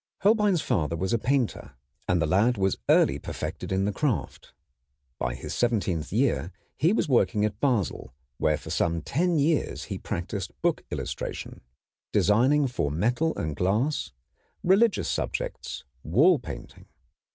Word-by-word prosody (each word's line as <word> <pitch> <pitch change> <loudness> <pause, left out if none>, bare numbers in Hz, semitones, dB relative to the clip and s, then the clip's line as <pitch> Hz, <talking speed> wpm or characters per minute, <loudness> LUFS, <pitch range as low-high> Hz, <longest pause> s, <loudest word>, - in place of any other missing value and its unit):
Holbein's 205 -5 +3
father 85 - 0
was 95 +6 -1
a 115 - +2
painter, 125 - -1 0.3
and 90 - +2
the 85 - +2
lad 105 +9 +3
was 95 -1 0
early - - +4
perfected - - -5
in 95 +1 +1
the 105 - +1
craft. 115 - -2 0.7
By 60 -1 -1
his 65 - -6
seventeenth 100 -9 0
year 95 - +1 0.2
he 165 +4 +3
was 220 - +1
working 115 -5 +3
at 105 -1 -3
Basel, 115 - 0 0.3
where 75 -1 +2
for - - -9
some 85 -2 0
ten 170 - +1
years 150 +1 +1
he - - -5
practised 90 +2 -5
book - - +1
illustration, - - -5 0.5
designing 130 +8 +4
for 120 - -1
metal 120 - 0
and 80 -3 -2
glass, 110 - 0 0.5
religious 200 +4 +3
subjects, - - -3 0.2
wall 150 - +4
painting. - - -9
110 Hz, 140 wpm, -27 LUFS, 90-145 Hz, 0.7 s, early